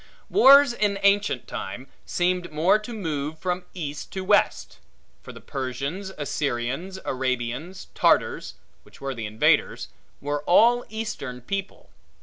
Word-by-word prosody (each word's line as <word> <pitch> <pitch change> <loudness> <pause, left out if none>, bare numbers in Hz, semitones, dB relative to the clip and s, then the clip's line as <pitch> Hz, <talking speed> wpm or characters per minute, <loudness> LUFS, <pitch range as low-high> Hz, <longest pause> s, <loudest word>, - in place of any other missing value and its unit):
Wars, 280 - +7
in 210 -4 0
ancient 200 - +2
time, 125 +7 -6 0.2
seemed 180 -1 0
more 165 +7 +3
to 215 +3 -9
move 155 -8 -3
from 180 +2 -3
east 150 -4 -6
to 190 - -3
west; - - +1 0.4
for - - -10
the - - -11
Persians, 140 +9 -4
Assyrians, 145 +5 -3
Arabians, 130 +6 -3
Tartars - - +1 0.3
(which - - -19
were 135 0 -4
the 115 -3 -5
invaders) 110 +1 +1 0.3
were 145 +1 -2
all 240 +7 +5
eastern 215 - -5
people. 195 - -6
165 Hz, 130 wpm, -25 LUFS, 135-200 Hz, 0.4 s, Wars